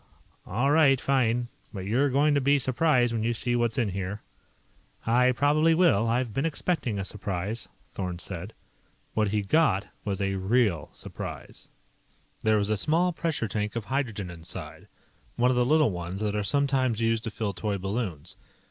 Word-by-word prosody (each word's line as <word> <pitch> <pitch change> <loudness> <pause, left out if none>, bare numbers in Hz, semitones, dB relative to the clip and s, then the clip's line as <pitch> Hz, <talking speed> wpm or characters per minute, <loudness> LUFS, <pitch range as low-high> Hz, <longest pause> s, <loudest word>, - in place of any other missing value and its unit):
"All 125 +9 +1
right. 145 -4 +5
Fine. 125 -3 +1 0.2
But 95 -3 -6
you're 130 +8 +2
going 145 +3 +3
to 140 - +2
be 140 +2 +4
surprised 130 -2 +2
when 115 - -1
you 115 +1 0
see 120 +1 0
what's 120 -2 0
in 115 -5 +1
here." 95 +2 -4 0.8
"I 125 +3 +4
probably 150 +5 +3
will. 150 - +4
I've 120 -1 0
been 135 - -1
expecting 160 - -1
a 95 - -2
surprise," 100 +2 -4 0.2
Thorn 90 -2 -4
said. 90 +3 -7 0.6
What 110 -1 +1
he 105 +1 0
got 105 -4 +2 0.2
was 100 -2 -2
a 95 -1 -1
real 95 -4 +1
surprise. - - -8 0.7
There 110 0 +3
was 105 0 0
a 110 - +2
small 170 - +2
pressure 160 -8 -2
tank 105 +1 -3
of 115 -3 -3
hydrogen 115 -9 -2
inside 80 -1 -8 0.5
one 125 +1 +3
of - - +1
the 125 - +3
little 155 -2 +4
ones 90 +1 -5
that 105 -1 -1
are 105 - 0
sometimes 135 -2 +2
used 115 -1 +1
to - - -1
fill 105 -1 -3
toy 105 +1 -2
balloons. 95 -5 -4
115 Hz, 175 wpm, -27 LUFS, 100-135 Hz, 0.8 s, right